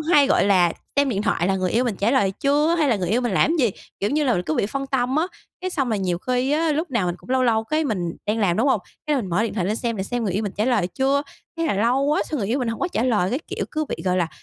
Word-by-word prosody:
hay, 305 Hz, -3 st, +4 dB
gọi 270 Hz, -, +3 dB
là, 185 Hz, -4 st, +4 dB, 0.2 s
xem 285 Hz, 0 st, +3 dB
điện 205 Hz, -5 st, -1 dB
thoại 195 Hz, -4 st, +1 dB
là 195 Hz, -, +1 dB
người 185 Hz, -1 st, -1 dB
yêu 240 Hz, +3 st, +2 dB
mình 225 Hz, -6 st, -1 dB
trả 210 Hz, +4 st, +1 dB
lời 205 Hz, -8 st, +3 dB
chưa, 295 Hz, +4 st, +3 dB
hay 310 Hz, -4 st, +2 dB
là 230 Hz, -, +3 dB
người 180 Hz, -3 st, -2 dB
yêu 225 Hz, +6 st, +2 dB
mình 240 Hz, -4 st, -1 dB
làm 190 Hz, -, +3 dB
cái 260 Hz, -, +4 dB
gì, -, -, 0 dB, 0.3 s
kiểu 200 Hz, -, 0 dB
như 300 Hz, +1 st, +1 dB
là, 255 Hz, -, +2 dB
mình 180 Hz, -, 0 dB
cứ 155 Hz, -, -2 dB
bị 200 Hz, -, +1 dB
phân 275 Hz, +5 st, -4 dB
tâm 260 Hz, 0 st, 0 dB
á. 320 Hz, +3 st, +2 dB, 0.3 s
Cái 370 Hz, -, -3 dB
xong 275 Hz, -7 st, -1 dB
rồi 220 Hz, -3 st, 0 dB
nhiều 180 Hz, -3 st, -1 dB
khi 255 Hz, +6 st, -1 dB
á, 315 Hz, +1 st, +2 dB
lúc 315 Hz, +2 st, -2 dB
nào 235 Hz, -8 st, 0 dB
mình 175 Hz, -, -1 dB
cũng -, -, -14 dB
lâu 260 Hz, 0 st, +2 dB
lâu 225 Hz, -2 st, +2 dB
cái 310 Hz, +6 st, 0 dB
mình 180 Hz, -, -2 dB
đang 210 Hz, +2 st, 0 dB
làm, 190 Hz, -5 st, +2 dB
đúng 245 Hz, +6 st, +2 dB
hông? 230 Hz, -, +2 dB, 0.3 s
Cái 300 Hz, -1 st, +2 dB
mình 240 Hz, -7 st, -2 dB
mở 180 Hz, +6 st, +1 dB
điện 230 Hz, -, -2 dB
thoại 185 Hz, -5 st, -1 dB
lên 210 Hz, +3 st, 0 dB
xem, 230 Hz, -1 st, -2 dB
để 190 Hz, -, -2 dB
xem 240 Hz, +3 st, -2 dB
người 195 Hz, -, -1 dB
yêu 205 Hz, +4 st, -1 dB
mình 205 Hz, -, -3 dB
trả 210 Hz, -, +1 dB
lời 235 Hz, -7 st, +2 dB
chưa, 270 Hz, +8 st, +1 dB, 0.3 s
thế 330 Hz, -, -1 dB
là 280 Hz, -, +1 dB
lâu 235 Hz, +6 st, +2 dB
quá 295 Hz, +2 st, +2 dB
xong 305 Hz, -, -1 dB
người 200 Hz, -4 st, -2 dB
yêu 245 Hz, +5 st, +1 dB
mình 250 Hz, -3 st, -1 dB
hổng 230 Hz, -, -4 dB
có 365 Hz, -, 0 dB
trả 230 Hz, -, -1 dB
lời, 210 Hz, -7 st, +1 dB
cái 255 Hz, -, 0 dB
kiểu, -, -, -3 dB
cứ 310 Hz, 0 st, -1 dB
bị, -, -, -4 dB
gọi 185 Hz, -1 st, +1 dB
là, 175 Hz, -3 st, +1 dB
235 Hz, 335 wpm, -23 LUFS, 195-275 Hz, 0.3 s, hay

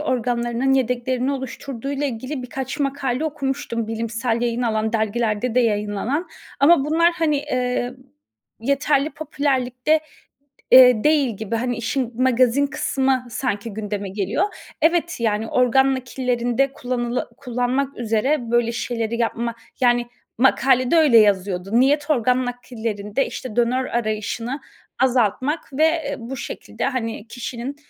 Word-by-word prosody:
organlarının 245 Hz, -1 st, 0 dB
yedeklerini 250 Hz, +1 st, 0 dB
oluşturduğuyla 275 Hz, +1 st, -4 dB
ilgili 255 Hz, +2 st, -4 dB
birkaç 265 Hz, +2 st, -5 dB
makale 275 Hz, 0 st, -1 dB
okumuştum, 270 Hz, -6 st, -2 dB
bilimsel 230 Hz, +1 st, -2 dB
yayın 240 Hz, +1 st, 0 dB
alan, 220 Hz, -1 st, 0 dB
dergilerde 220 Hz, +1 st, 0 dB
de 250 Hz, -, +5 dB
yayınlanan. 215 Hz, -, -1 dB, 0.3 s
Ama 280 Hz, -1 st, +6 dB
bunlar, 335 Hz, +3 st, +3 dB
hani, 325 Hz, -3 st, +1 dB
eee, 250 Hz, -3 st, -1 dB, 0.7 s
yeterli 280 Hz, +3 st, +1 dB
popülerlikte, 275 Hz, -1 st, 0 dB, 0.7 s
eee, 250 Hz, -4 st, +8 dB
değil 285 Hz, -8 st, +2 dB
gibi. 220 Hz, +1 st, -3 dB
Hani, 245 Hz, +1 st, -1 dB
işin 240 Hz, 0 st, -2 dB
magazin 255 Hz, +2 st, +3 dB
kısmı 265 Hz, -2 st, 0 dB
sanki 230 Hz, -3 st, -3 dB
gündeme 205 Hz, -2 st, -4 dB
geliyor. 200 Hz, -, 0 dB, 0.4 s
Evet, 340 Hz, +1 st, +2 dB
yani, 220 Hz, -1 st, 0 dB
organ 265 Hz, +3 st, +3 dB
nakillerinde 250 Hz, +1 st, -1 dB
kullanıla 245 Hz, 0 st, -2 dB
kullanmak 255 Hz, +1 st, -2 dB
üzere 235 Hz, +3 st, 0 dB
böyle 240 Hz, -1 st, +2 dB
şeyleri 230 Hz, -1 st, -2 dB
yapma 235 Hz, 0 st, -1 dB, 0.3 s
Yani, 240 Hz, -1 st, +3 dB, 0.3 s
makalede 260 Hz, +1 st, +3 dB
öyle 290 Hz, -8 st, +6 dB
yazıyordu. 195 Hz, -3 st, +2 dB
Niyet 290 Hz, +3 st, +2 dB
organ 250 Hz, -2 st, +2 dB
nakillerinde, 230 Hz, -2 st, -3 dB
işte, 245 Hz, -4 st, -7 dB
donör 250 Hz, +2 st, +2 dB
arayışını 230 Hz, +3 st, -2 dB, 0.4 s
azaltmak 260 Hz, +4 st, +1 dB
ve, 305 Hz, +4 st, +2 dB
eee, 315 Hz, -3 st, -1 dB
bu 245 Hz, +3 st, -6 dB
şekilde, 235 Hz, -, -5 dB
hani, 230 Hz, -4 st, -3 dB
kişinin 245 Hz, +3 st, -6 dB
250 Hz, 120 wpm, -22 LUFS, 230-270 Hz, 0.7 s, eee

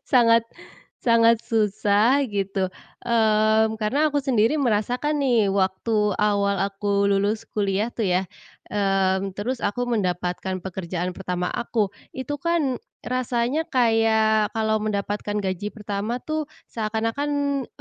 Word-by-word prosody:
sangat 230 Hz, -2 st, +5 dB, 0.5 s
sangat 230 Hz, -1 st, +4 dB
susah 215 Hz, +4 st, +2 dB
gitu, 195 Hz, -2 st, -1 dB, 0.3 s
eee, 220 Hz, -2 st, +3 dB
karena 245 Hz, +8 st, +1 dB
aku 290 Hz, -1 st, -1 dB
sendiri 240 Hz, -2 st, +2 dB
merasakan 250 Hz, +3 st, 0 dB
nih 235 Hz, -7 st, +2 dB
waktu 200 Hz, +2 st, +1 dB
awal 200 Hz, -1 st, +1 dB
aku 200 Hz, 0 st, 0 dB
lulus 205 Hz, +3 st, +1 dB
kuliah 205 Hz, +2 st, 0 dB
tuh 225 Hz, -3 st, -2 dB
ya, 180 Hz, 0 st, +2 dB, 0.5 s
eee, 195 Hz, -1 st, +1 dB
terus 235 Hz, +6 st, -3 dB
aku 235 Hz, +2 st, -2 dB
mendapatkan 185 Hz, -4 st, -2 dB
pekerjaan 180 Hz, -1 st, -4 dB
pertama 180 Hz, -1 st, -3 dB
aku 220 Hz, -4 st, -1 dB, 0.2 s
itu 290 Hz, +3 st, -4 dB
kan 300 Hz, -4 st, 0 dB, 0.2 s
rasanya 255 Hz, +4 st, -1 dB
kayak 220 Hz, -3 st, +2 dB
kalau 220 Hz, -1 st, +1 dB
mendapatkan 205 Hz, 0 st, -2 dB
gaji 190 Hz, +2 st, -3 dB
pertama 210 Hz, +3 st, -4 dB
tuh 310 Hz, -1 st, -2 dB, 0.2 s
seakan-akan 265 Hz, +5 st, -1 dB
215 Hz, 115 wpm, -24 LUFS, 200-240 Hz, 0.5 s, sangat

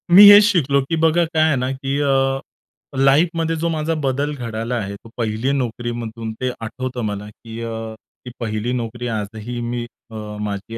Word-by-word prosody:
मी 205 Hz, +2 st, +12 dB
हेच 205 Hz, +1 st, +10 dB
शिकलो, 145 Hz, -, +3 dB
की 135 Hz, +5 st, -2 dB
बघा 165 Hz, +1 st, +3 dB
काय 160 Hz, -1 st, +1 dB
आहे 155 Hz, -3 st, +3 dB
ना 130 Hz, +1 st, -1 dB
की 135 Hz, +1 st, -2 dB
अ, 135 Hz, -1 st, +2 dB, 0.6 s
लाईफमध्ये 165 Hz, +4 st, +3 dB
जो 170 Hz, +1 st, -1 dB
माझा 160 Hz, 0 st, -1 dB
बदल 140 Hz, +3 st, 0 dB
घडला 115 Hz, -1 st, -3 dB
आहे, 100 Hz, -3 st, -3 dB
तो 115 Hz, -, -15 dB
पहिली 115 Hz, +3 st, 0 dB
नोकरीमधून 120 Hz, -3 st, -3 dB
ते 130 Hz, -, +1 dB, 0.2 s
आठवतं 130 Hz, +1 st, -4 dB
मला 105 Hz, 0 st, -4 dB
की 115 Hz, +1 st, -10 dB
अ, 115 Hz, -1 st, -5 dB, 0.3 s
ती 125 Hz, -, -7 dB
पहिली 110 Hz, +1 st, -2 dB
नोकरी 120 Hz, 0 st, -3 dB
आजही 110 Hz, +1 st, -4 dB
अ, -, -, -3 dB
मी 120 Hz, 0 st, -3 dB, 0.6 s
माझी 105 Hz, +2 st, -5 dB
125 Hz, 175 wpm, -20 LUFS, 115-145 Hz, 0.6 s, मी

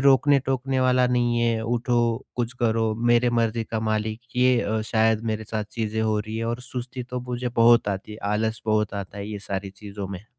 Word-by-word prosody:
रोकने-टोकने 135 Hz, -1 st, +3 dB
वाला 125 Hz, 0 st, +4 dB
नहीं 120 Hz, -1 st, +1 dB
है, 115 Hz, -1 st, +1 dB
उठो, 120 Hz, 0 st, 0 dB
कुछ 120 Hz, 0 st, -1 dB
करो, 110 Hz, -1 st, +2 dB
मेरी 120 Hz, +1 st, +3 dB
मर्ज़ी 115 Hz, -1 st, +1 dB
का 110 Hz, 0 st, -3 dB
मालिक 110 Hz, 0 st, -1 dB, 0.2 s
ये 125 Hz, -1 st, +4 dB
अ, 110 Hz, 0 st, -1 dB
शायद 110 Hz, 0 st, +3 dB
मेरे 110 Hz, 0 st, -4 dB
साथ 110 Hz, -1 st, -3 dB
चीज़ें 110 Hz, -1 st, -2 dB
हो 110 Hz, -1 st, +1 dB
रही 110 Hz, +1 st, -4 dB
हैं 115 Hz, -, -2 dB
और 120 Hz, +1 st, -2 dB
सुस्ती 125 Hz, 0 st, -5 dB
तो 125 Hz, +1 st, -5 dB
मुझे 125 Hz, 0 st, -3 dB
बहुत 115 Hz, -2 st, +6 dB
आती 100 Hz, +2 st, -4 dB
है, 105 Hz, -, -9 dB
आलस 110 Hz, +1 st, -1 dB
बहुत 105 Hz, -1 st, +1 dB
आता 100 Hz, 0 st, -6 dB
है 100 Hz, +1 st, -5 dB
ये 105 Hz, -, -5 dB
सारी 95 Hz, 0 st, -3 dB
चीज़ों 100 Hz, 0 st, -7 dB
में। 95 Hz, +1 st, -7 dB
115 Hz, 200 wpm, -24 LUFS, 110-120 Hz, 0.2 s, बहुत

